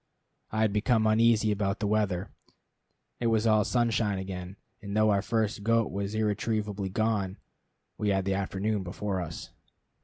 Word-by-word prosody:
I 110 - -1
had 110 -2 +2
become 110 +1 +2
uneasy 110 0 +4
about 100 -1 -1
the 105 - -1
weather. 100 -3 0 0.9
It 120 - 0
was 110 -1 +2
all 110 -1 +4
sunshine 115 -4 +1
again, 95 -1 -6 0.3
and 100 0 -4
though 110 0 +4
our 100 -1 +2
first 110 -1 -1
goat 115 +1 +2
was 100 +2 -3
irretrievably 105 -2 -1
gone, 100 -2 0 0.6
we 105 - +1
had 95 -1 +1
the 95 - +1
afternoon 100 +2 -1
before 95 +1 -3
us. 80 -2 -7
105 Hz, 155 wpm, -28 LUFS, 100-110 Hz, 0.9 s, uneasy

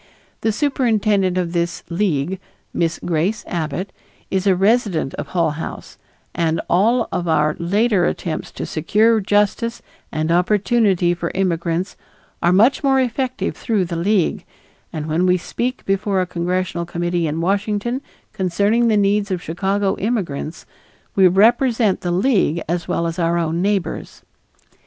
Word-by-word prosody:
The 220 - +1
superintendent 215 -8 +1
of 175 -2 -1
this 170 0 -1
League, 175 -1 -1 0.3
Miss 170 -1 0
Grace 175 +7 0
Abbott, 170 +3 -3 0.4
is 190 +1 0
a 190 - +5
resident 195 - +1
of - - -5
Hull 170 -4 +1
House 150 +2 -7 0.3
and 165 -1 0
all 225 +7 +2
of 175 - -2
our 150 -1 +2
later 200 +2 +2
attempts 165 -2 -3
to - - -5
secure 215 +8 +2
justice 210 +4 0 0.3
and 155 +1 -1
opportunity 190 0 +2
for 170 -1 -3
immigrants 175 -1 -1 0.5
are 175 - +3
much 230 +11 +4
more 270 -1 +3
effective 255 +1 -1
through 210 -6 0
the 170 0 -5
League, 185 +1 +1 0.5
and 155 -1 -4
when 160 +4 +1
we 180 0 +4
speak 245 +8 -4
before 195 0 0
a 185 - +1
congressional 175 0 -2
committee 175 -1 -1
in 155 +2 -2
Washington 205 +7 -1 0.3
concerning 205 +4 +1
the 220 -2 +3
needs 200 0 +2
of 185 -2 -1
Chicago 195 +4 0
immigrants, 180 -8 -3 0.5
we 190 -2 +6
represent 225 +2 +3
the 175 - -2
League 185 - +2
as 170 +1 -2
well 170 - -1
as 165 +2 -3
our 170 0 +1
own 165 0 -1
neighbors. 200 -1 -2
185 Hz, 145 wpm, -20 LUFS, 170-210 Hz, 0.5 s, we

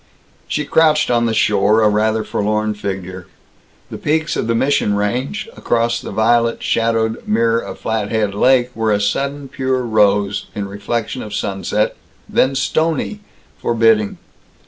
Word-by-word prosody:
She 150 - -2
crouched 155 -2 +3
on 120 -1 +2
the 115 - 0
shore, 105 +1 +3
a - - +5
rather 110 +1 +1
forlorn 105 +1 -1
figure. 95 -3 -6 0.6
The - - -6
peaks 155 +2 0
of - - -2
the 115 - +1
Mission 130 -4 +1
Range, 125 - -2
across 120 0 0
the - - -7
violet 115 +1 +1
shadowed 115 -1 0
mirror 115 +1 +2
of - - -7
Flathead 110 -2 -1
Lake, 125 +3 +2
were 110 -1 0
a 105 - +2
sudden 140 +7 -2
pure 130 -1 -1
rose, 105 -3 +1
in 100 -1 -3
reflection 110 +5 -3
of 105 -1 -6
sunset, 105 +1 -1 0.3
then 135 +1 +2
stony, 160 +8 0 0.4
forbidding. 115 -3 +2
110 Hz, 145 wpm, -18 LUFS, 105-125 Hz, 0.6 s, a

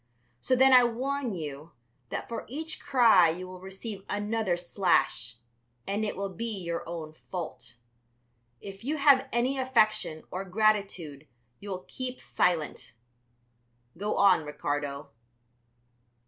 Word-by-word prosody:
So 255 - +2
then 265 +1 +6
I 250 -1 +9
warn 250 0 -1
you 150 -1 -7 0.4
that - - -4
for 235 - -5
each 315 +6 -3
cry 230 - +6
you 180 +3 -4
will 185 0 -10
receive 195 +1 -8
another 205 -3 0
slash, 170 - +1 0.5
and 205 +2 -1
it 210 - -3
will 195 -1 -3
be 225 +3 -4
your 170 0 -2
own 160 -2 -6
fault. 165 -7 -7 0.8
If 195 +1 -10
you 300 +5 -1
have 280 -2 +5
any 255 +3 +1
affection 215 -10 +2
or 185 +1 -3
gratitude 190 -7 0 0.3
you 205 - -9
will 185 -1 -5
keep 255 -1 -5
silent. 165 -8 -1 1.0
Go 205 +4 -2
on, 200 -5 +5
Ricardo." 145 -1 -4
200 Hz, 130 wpm, -28 LUFS, 170-235 Hz, 1.0 s, I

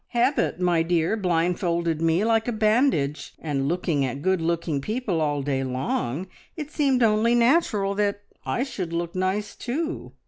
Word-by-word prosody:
Habit, 250 -4 +2
my 175 -2 +2
dear, 165 +3 +1
blindfolded 170 -3 0
me 165 +4 +2
like 225 0 +2
a - - +1
bandage, 215 - +1
and 140 -3 -2
looking 165 -3 0
at 135 +2 -3
good 190 -1 +2
looking 165 -3 -1
people 210 - -2
all 145 -2 0
day 135 -1 -1
long 130 +3 -2 0.3
it 300 -1 -6
seemed 270 -5 +2
only 225 +2 +3
natural 235 -6 +2
that 205 0 -1 0.2
I 245 - -1
should 190 -11 -5
look 170 0 -2
nice 190 +3 -1
too. 315 +7 -4
180 Hz, 160 wpm, -25 LUFS, 160-225 Hz, 0.3 s, only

